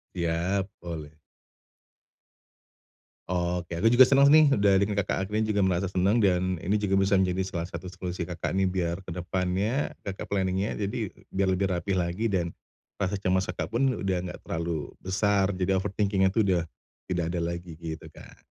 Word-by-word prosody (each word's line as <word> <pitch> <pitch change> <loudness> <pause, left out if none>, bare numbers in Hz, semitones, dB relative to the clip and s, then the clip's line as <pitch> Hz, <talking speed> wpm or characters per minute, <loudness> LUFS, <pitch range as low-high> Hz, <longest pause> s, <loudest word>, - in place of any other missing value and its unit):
Iya, 90 +3 0
boleh. 80 -4 -6 2.2
Oh 90 -1 0
oke, 85 - -18
aku 110 +7 +4
juga 120 - +6
senang 140 +1 +6
nih, 155 -2 +7
udah 100 -1 +4
dengerin 100 0 0
Kakak 100 0 0
akhirnya 110 +1 0
juga 100 - +2
merasa 95 -1 +1
senang 95 +3 +2
dan 95 -3 +2
ini 90 +5 -2
juga 95 -2 +2
bisa 95 +1 +2
menjadi 95 0 +1
salah 85 -3 -4
satu 85 +1 -7
solusi 90 -1 -5
Kakak 85 -1 -4
nih 95 - +3
biar 90 -2 -1
ke 85 - -6
depannya, 95 - -1
Kakak 100 -1 -5
planning-nya, 95 +1 -1
jadi 105 0 -3 0.2
biar 95 0 0
lebih 95 +1 0
rapi 90 +2 -1
lagi 90 +4 -1
dan 85 -3 +1 0.5
rasa 100 0 -2
cemas 95 0 +1
Kakak 90 0 -4
pun 125 +3 +1
udah 95 -2 0
enggak 90 - -7
terlalu 80 -2 -3
besar, 100 +1 +1
jadi 95 +1 +1
overthinking-nya 95 -1 +1
itu 110 - +3
sudah 90 -5 +1 0.4
tidak 90 -2 -1
ada 85 0 -2
lagi, 85 -1 -5
gitu 80 -1 -7
Kak. - - -15
95 Hz, 170 wpm, -27 LUFS, 90-100 Hz, 2.2 s, nih